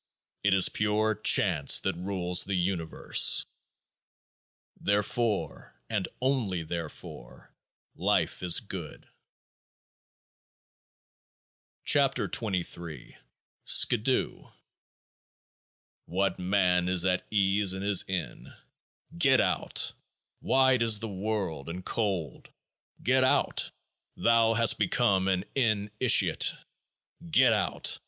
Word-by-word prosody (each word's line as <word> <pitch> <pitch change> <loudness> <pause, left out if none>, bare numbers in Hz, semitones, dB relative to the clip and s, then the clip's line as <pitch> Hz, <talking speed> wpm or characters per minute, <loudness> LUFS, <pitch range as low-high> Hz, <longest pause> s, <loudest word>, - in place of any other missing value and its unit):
It 100 -1 +3
is 95 - +5
Pure 105 0 -1
Chance 85 -8 +3
that - - -2
rules 90 -1 0
the 100 - -3
Universe; 90 -3 +2 1.3
therefore, 105 +2 -3
and 105 -4 -2
only 120 -10 -1
therefore, 80 -7 -9 0.4
life - - -1
is 90 -2 +4
good. - - -9 2.8
31 140 -2 +4
KEOAAH - - -3
KT - - -19
(23) 85 - -4 0.5
SKIDOO 125 +3 +2 1.5
What 95 +1 -2
man 90 -1 +1
is 90 -1 +2
at 90 -1 -1
ease 100 -1 +2
in 95 0 -6
his 100 -2 +3
Inn? 95 -3 -6 0.6
Get 140 -6 +3
out. - - -1 0.5
Wide 130 -2 +2
is 115 -2 +4
the 115 +2 -5
world 95 -6 -4
and 90 +2 -8
cold. 95 - -3 0.5
Get 130 +1 +2
out. 130 - 0 0.5
Thou 115 -1 +2
hast 115 -1 +2
become 95 -1 +1
an 95 0 -1
in 110 -6 -1
itiate. 125 -2 +3 0.7
Get 130 -6 +4
out. 105 - -3
100 Hz, 100 wpm, -27 LUFS, 90-115 Hz, 2.8 s, is